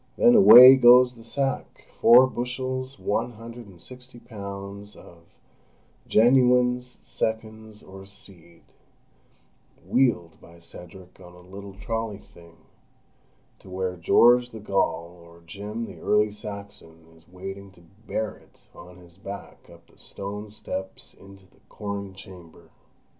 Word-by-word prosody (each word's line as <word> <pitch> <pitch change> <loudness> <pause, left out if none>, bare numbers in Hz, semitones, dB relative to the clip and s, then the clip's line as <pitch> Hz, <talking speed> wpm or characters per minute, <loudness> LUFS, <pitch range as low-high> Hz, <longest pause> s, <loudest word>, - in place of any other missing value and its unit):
Then 240 - +5
away 135 - +9
goes 125 0 +6
the 115 -2 -16
sack—four 130 -2 +2
bushels, 130 +1 -5
one 120 +4 -3
hundred 115 +1 -12
and 90 -3 -17
sixty 125 +7 -14
pounds 100 -3 -10
of 85 -1 -17 0.8
"genuines, 125 +1 +2
seconds, 110 -1 -6
or 95 0 -13
seed"—wheeled 90 +3 -6
by 85 +1 -17
Cedric 90 +2 -14
on 90 -1 -15
a 90 - -16
little 100 +1 -11
trolley 110 +1 -5
thing, 85 -4 -19 1.0
to - - -16
where 95 0 -4
George 120 +7 +3
the 110 - -11
Gaul 90 -4 -2
or 85 0 -18
Jim 105 +6 -7
the - - -12
Early 105 0 +1
Saxon 100 -6 -11
is 80 +1 -24
waiting 95 +2 -9
to 90 - -21 0.3
bear 110 -1 -4
it - - -26
on 90 +1 -14
his 90 0 -19
back 100 +1 -11
up - - -18
the - - -26
stone 105 +2 -7
steps 95 -2 -8
into 95 0 -17
the 95 - -28
corn 100 -2 -7
chamber. 90 -3 -15
100 Hz, 125 wpm, -24 LUFS, 95-120 Hz, 1.0 s, away